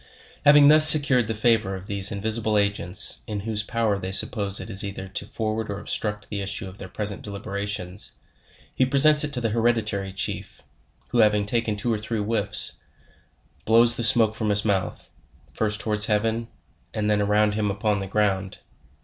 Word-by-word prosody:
Having 145 0 +6
thus 155 +1 +9
secured 135 -7 +6
the 115 - -4
favor 110 -3 0
of 95 0 -10
these 100 0 +1
in 100 -1 -6
visible 110 0 -1
agents, 100 -2 0
in 105 -2 -5
whose 110 0 -2
power 110 -2 -2
they 95 0 -6
suppose 100 -1 +1
it - - -8
is 95 - -1
either 100 -1 -7
to 95 - -6
forward 110 0 -4
or 100 0 -5
obstruct 105 0 -4
the 100 -1 -5
issue 100 0 -5
of 95 +2 -13
their 95 - -8
present 105 -2 -5
deliberations, 100 -2 -6 0.6
he - - 0
presents 145 +3 +4
it 150 - -3
to 130 - -3
the 115 -2 -2
hereditary 110 -4 -1
chief, 95 +1 -5 0.5
who 120 - -1
having 105 -2 +2
taken 115 0 -1
two 115 +3 -2
or 110 - -3
three 110 +2 -5
whiffs, 105 -1 0 0.8
blows 115 +1 +4
the - - -4
smoke 115 -1 +5
from 110 -1 -4
his 105 +1 +3
mouth, 100 -3 -3 0.4
first 105 0 -3
to - - -6
wards 105 0 +4
heaven, 115 +2 -1 0.5
and 105 -1 -2
then 105 -1 +1
around 105 +1 +1
him 105 0 -2
upon 105 +1 -2
the 95 - -6
ground. 95 -1 -2
105 Hz, 185 wpm, -23 LUFS, 100-115 Hz, 0.8 s, thus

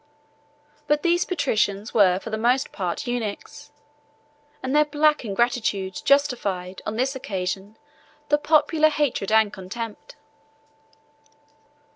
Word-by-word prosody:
But 295 0 +1
these 345 0 +2
patricians 220 - -1
were 190 -4 +5
for 225 +4 -7
the - - 0
most 245 +4 +1
part 180 -3 -3
eunuchs; 245 +5 -5 0.9
and 260 +2 -1
their 300 - +6
black 300 0 +2
ingratitude 205 -3 -1
justified, 205 -10 0
on 215 - -3
this 260 +4 0
occasion, 195 -2 -4 0.5
the 295 0 +3
popular 310 +1 +3
hatred 290 -9 -1
and 220 -1 +4
contempt. 210 +3 -7
235 Hz, 110 wpm, -24 LUFS, 200-290 Hz, 0.9 s, their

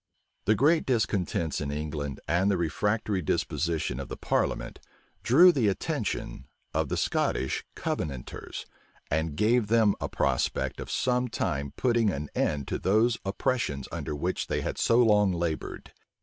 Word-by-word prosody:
The 110 - +4
great 155 +8 +3
discontents 100 - 0
in 70 - -2
England, 75 -1 -4
and 85 +5 +2
the 100 - +2
refractory 100 +4 0
disposition 80 -3 -1
of 70 - -5
the - - -6
parliament, - - -1 0.4
drew 170 +10 +7
the 130 -10 +1
attention 85 -8 -2 0.3
of - - 0
the - - -1
Scottish 65 - 0
Covenanters, 70 -5 -4 0.5
and 80 0 0
gave 110 +5 +3
them 110 -2 +4
a - - -2
prospect - - 0
of - - -6
some 125 0 +1
time 70 - -2
putting 120 -4 +2
an 75 -5 -3
end 70 -2 0
to - - -2
those 110 +5 +2
oppressions 95 - -1
under 75 - -4
which 90 +6 -2
they - - -1
had - - -3
so 115 - +3
long 105 -4 +4
labored. 85 -2 -4
95 Hz, 150 wpm, -28 LUFS, 75-115 Hz, 0.5 s, drew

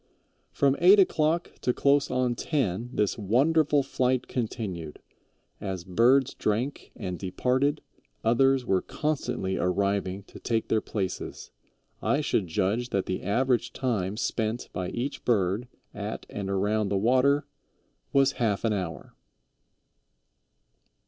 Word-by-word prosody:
"From 140 -1 +2
eight 185 +4 +7
o'clock 165 -2 +2
to 125 - +1
close 140 +1 +3
on 125 -1 +1
ten 120 - -1
this 105 -1 0
wonderful 145 +7 +3
flight 130 -1 0
continued; 100 - -4 0.6
as 95 -3 -4
birds 120 +8 +3
drank 120 +7 -2
and 90 -1 -5
departed, 130 +10 0 0.4
others 130 +3 +3
were 95 -4 +2
constantly 140 -11 -2
arriving 100 +1 0
to - - -13
take 115 -1 -1
their 110 - +2
places. 95 -4 -4 0.5
I 140 - +1
should 105 -9 0
judge 105 +9 0
that 100 -1 0
the 95 - -3
average 120 +4 +1
time 105 -6 -1
spent 115 0 -2
by 90 0 -3
each 130 +4 -4
bird 105 0 +1 0.3
at - - -5
and 100 -1 -4
around 105 +2 +1
the 100 - +1
water 130 +7 +3 0.7
was 135 -1 +4
half 105 -4 +1
an 110 - +2
hour." 90 -5 -5
115 Hz, 125 wpm, -27 LUFS, 100-135 Hz, 0.7 s, eight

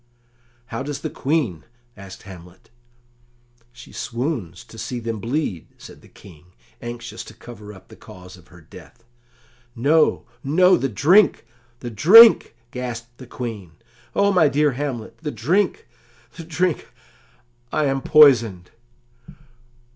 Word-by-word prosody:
"How 115 +1 -6
does 145 +1 -6
the - - -5
Queen?" 130 - -2 0.3
asked 95 -1 -12
Hamlet. 90 -2 -15 1.0
"She 125 -1 -15
swoons 115 - -5
to 115 - -14
see 125 +2 -5
them 115 -2 -5
bleed," 115 - -3
said - - -14
the - - -19
King, 90 -1 -18 0.3
anxious 120 0 -8
to 110 - -14
cover 110 -3 -12
up 95 -2 -16
the - - -14
cause 90 0 -14
of 90 -1 -20
her 90 0 -17
death. 80 +8 -16 0.7
"No, 150 +6 +2 0.2
no, 180 +7 +4
the 135 +2 -2
drink, 170 - +3 0.4
the 120 - -6
drink!" 200 - +7 0.2
gasped 120 -1 -7
the 130 - -11
Queen, 110 -9 -7 0.4
"O 200 0 +2
my 170 -5 +4
dear 145 +1 +1
Hamlet 130 -4 -6
the 155 - -5
drink, 165 - -1 0.5
the 165 -1 -10
drink! 170 0 -2 0.8
I 155 - 0
am 135 -1 -1
poisoned!" 115 -14 +4
120 Hz, 130 wpm, -21 LUFS, 105-150 Hz, 1.0 s, drink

